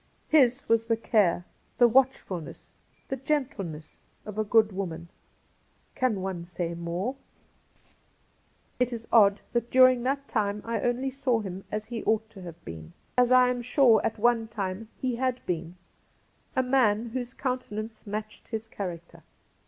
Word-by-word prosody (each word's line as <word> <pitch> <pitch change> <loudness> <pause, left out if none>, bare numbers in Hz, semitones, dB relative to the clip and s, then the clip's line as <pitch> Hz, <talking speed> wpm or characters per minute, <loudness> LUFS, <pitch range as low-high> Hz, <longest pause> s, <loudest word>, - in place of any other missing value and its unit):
His 270 -4 +4
was 230 0 +2
the 230 -1 +2
care, 200 -6 +2 0.3
the 240 - +7
watchfulness, 235 - 0 0.4
the 270 - -2
gentleness, 240 - -3 0.3
of 210 0 -6
a - - +3
good 215 0 +4
woman. 170 -3 -5 0.8
Can 235 -7 0
one 185 -3 -3
say 170 0 -4
more? 170 +9 -3 1.6
It 250 0 +2
is 230 -1 -6
odd 200 -3 +5
that 235 0 0
during 255 -1 +6
that 275 +3 -1
time 210 -3 -1
I 230 -2 -2
only 250 +2 0
saw 255 -3 0
him 190 -1 -7
as 215 0 -3
he 230 -1 -5
ought 220 0 +1
to 200 -4 -12
have 170 -2 -10
been 80 0 -9
— - - -39
as 250 0 +4
I 255 0 +6
am 250 -1 -1
sure 240 -2 +4
at 225 - -1
one 230 0 +2
136 - - -16
Cassidy 205 - -1 0.2
time - - -35
he 255 -2 -1
had 255 0 -1
been 170 0 -3 0.4
— - - -38
a 260 - +3
man 240 -4 +2
whose 250 +1 -4
countenance 225 -5 -4
matched 215 +1 -6
his 225 -1 -5
character. 170 -5 -7
225 Hz, 165 wpm, -27 LUFS, 195-250 Hz, 1.6 s, the